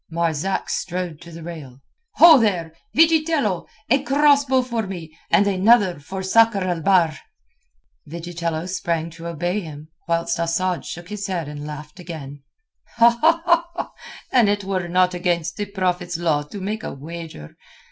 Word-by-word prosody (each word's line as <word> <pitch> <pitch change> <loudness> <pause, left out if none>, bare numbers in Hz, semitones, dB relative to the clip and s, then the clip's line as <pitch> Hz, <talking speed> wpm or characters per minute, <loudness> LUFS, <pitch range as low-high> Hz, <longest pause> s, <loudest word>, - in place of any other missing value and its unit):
Marzak 170 +2 -1
strode 175 -3 -3
to 170 0 -12
the 165 0 -10
rail. 150 -7 -9 0.4
"Ho 330 -4 +9
there! 180 -8 0 0.2
Vigitello! 315 - +3 0.2
A 270 +4 +3
cross 285 0 +4
bow 260 -1 +2
for 235 -4 -3
me, 165 -4 -8
and 205 - +4
another 200 -2 +3
for 190 +7 -6
Sakr 215 +1 +4
el 175 -3 -2
Bahr." 170 -3 +3 0.9
Vigitello 170 0 -4
sprang 170 -3 -2
to 165 +1 -9
obey 175 +4 -2
him, 155 -4 -9 0.2
whilst 170 0 0
Asad 175 +2 -1
shook 175 +1 -8
his 210 -1 -4
head 175 -5 -3
and 150 0 -7
laughed 150 +3 -9
again. 145 -5 -8 1.9
"An 240 -4 +5
it 205 0 0
were 190 -2 -2
not 180 +1 +2
against 175 -2 -1
the 205 -1 -3
Prophet's 180 -3 -2
law 160 -4 +1
to 150 +8 -9
make 210 +3 -3
a - - -6
wager...." 155 - -9
175 Hz, 145 wpm, -22 LUFS, 165-200 Hz, 1.9 s, Ho